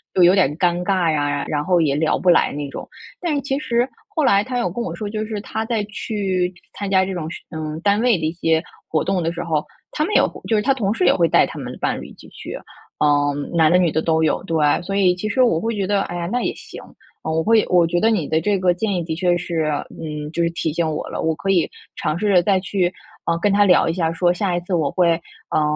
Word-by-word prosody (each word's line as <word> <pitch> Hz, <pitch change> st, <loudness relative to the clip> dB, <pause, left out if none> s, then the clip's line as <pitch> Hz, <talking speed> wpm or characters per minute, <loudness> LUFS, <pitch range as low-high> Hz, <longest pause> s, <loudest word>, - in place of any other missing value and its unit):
就 185 Hz, -, +5 dB
有 175 Hz, +1 st, +7 dB
点 155 Hz, -7 st, +2 dB
尴 175 Hz, 0 st, +1 dB
尬 180 Hz, -4 st, +1 dB
呀， 145 Hz, -1 st, -1 dB
然 150 Hz, -1 st, -1 dB
后 180 Hz, +2 st, +2 dB
也 150 Hz, -4 st, +2 dB
聊 155 Hz, +2 st, +1 dB
不 -, -, -5 dB
来 -, -, +3 dB
那 145 Hz, 0 st, -4 dB
种。 -, -, -8 dB, 0.3 s
但 340 Hz, -4 st, 0 dB
是 285 Hz, -, 0 dB
其 270 Hz, 0 st, -2 dB
实 240 Hz, -2 st, 0 dB, 0.2 s
后 310 Hz, -, -1 dB
来 200 Hz, -7 st, +4 dB
他 255 Hz, 0 st, -3 dB
有 235 Hz, -, 0 dB
跟 235 Hz, +7 st, -4 dB
我 240 Hz, -, -4 dB
说 210 Hz, -2 st, -5 dB
就 215 Hz, +1 st, -3 dB
是 215 Hz, -2 st, -4 dB
他 220 Hz, +1 st, -4 dB
在 225 Hz, -2 st, -1 dB
去 195 Hz, -3 st, -2 dB, 0.2 s
参 200 Hz, -, -5 dB
加 190 Hz, -1 st, +4 dB
这 190 Hz, 0 st, -3 dB
种 170 Hz, -4 st, -4 dB, 0.2 s
嗯， 155 Hz, -1 st, -5 dB
单 205 Hz, +1 st, +2 dB
位 240 Hz, -4 st, +3 dB
的 160 Hz, -, -3 dB
一 155 Hz, -, 0 dB
些 165 Hz, -1 st, 0 dB, 0.2 s
活 155 Hz, -, 0 dB
动 190 Hz, -2 st, 0 dB
的 165 Hz, 0 st, -1 dB
时 175 Hz, 0 st, -4 dB
候， 155 Hz, -3 st, -1 dB, 0.3 s
他 305 Hz, -, 0 dB
们 420 Hz, -, -2 dB
也 -, -, +6 dB
会 -, -, -3 dB
就 225 Hz, -, +2 dB
是 210 Hz, -, +2 dB
他 275 Hz, -, +3 dB
同 215 Hz, -6 st, -1 dB
事 225 Hz, -, -1 dB
也 -, -, +5 dB
会 170 Hz, -2 st, +3 dB
带 -, -, +4 dB
他 -, -, -8 dB
们 -, -, -6 dB
的 -, -, -10 dB
伴 -, -, -1 dB
侣 -, -, -8 dB
一 -, -, -14 dB
起 -, -, -15 dB
去， -, -, -8 dB, 0.4 s
嗯， 145 Hz, -1 st, +1 dB
男 160 Hz, -2 st, +5 dB
的 180 Hz, -, +5 dB
女 175 Hz, -3 st, +2 dB
的 160 Hz, -, 0 dB
都 160 Hz, 0 st, +1 dB
有， 155 Hz, -, +1 dB
对。 165 Hz, -3 st, -2 dB, 0.3 s
所 195 Hz, +3 st, -4 dB
以 190 Hz, -3 st, +4 dB
其 180 Hz, +4 st, -4 dB
实 230 Hz, +5 st, +1 dB
我 195 Hz, -10 st, +3 dB
会 225 Hz, +4 st, -2 dB
觉 200 Hz, -2 st, -1 dB
得， 200 Hz, +1 st, +1 dB
哎 175 Hz, -, -6 dB
呀， 175 Hz, -1 st, -3 dB
那 245 Hz, -, 0 dB
也 -, -, -2 dB
行。 -, -, -11 dB, 0.4 s
呃， 160 Hz, -, -2 dB
我 160 Hz, 0 st, 0 dB
会 225 Hz, -1 st, +4 dB
我 175 Hz, -2 st, +5 dB
觉 175 Hz, +1 st, 0 dB
得 225 Hz, -, +3 dB
你 185 Hz, -9 st, 0 dB
的 160 Hz, -, +1 dB
这 200 Hz, +5 st, +1 dB
个 180 Hz, -1 st, +3 dB
建 200 Hz, +3 st, -2 dB
议 175 Hz, -, -1 dB
的 160 Hz, -1 st, -4 dB
确 175 Hz, -1 st, +2 dB
是 170 Hz, -2 st, -2 dB, 0.3 s
嗯， 150 Hz, -1 st, -6 dB
就 170 Hz, -, -2 dB
是 170 Hz, -, +2 dB
提 165 Hz, -1 st, -2 dB
醒 165 Hz, +1 st, 0 dB
我 155 Hz, -, -3 dB
了， -, -, -5 dB
我 160 Hz, 0 st, 0 dB
可 195 Hz, -, -4 dB
以 180 Hz, -4 st, +2 dB, 0.3 s
尝 155 Hz, -, -1 dB
试 210 Hz, +3 st, 0 dB
着， 200 Hz, -, +3 dB
呃， 180 Hz, -, +7 dB
再 195 Hz, 0 st, +3 dB
去 185 Hz, -2 st, -1 dB, 0.5 s
跟 205 Hz, -, +2 dB
他 205 Hz, +1 st, +4 dB
聊 180 Hz, -3 st, +4 dB
一 165 Hz, -, 0 dB
下， 165 Hz, -2 st, -1 dB
说 175 Hz, +1 st, +2 dB
下 180 Hz, 0 st, -1 dB
一 -, -, 0 dB
次 180 Hz, +2 st, -5 dB
我 155 Hz, -4 st, +1 dB
会， 170 Hz, -2 st, +2 dB, 0.3 s
呃， 155 Hz, -, +1 dB
180 Hz, 300 characters per minute, -21 LUFS, 160-205 Hz, 0.5 s, 有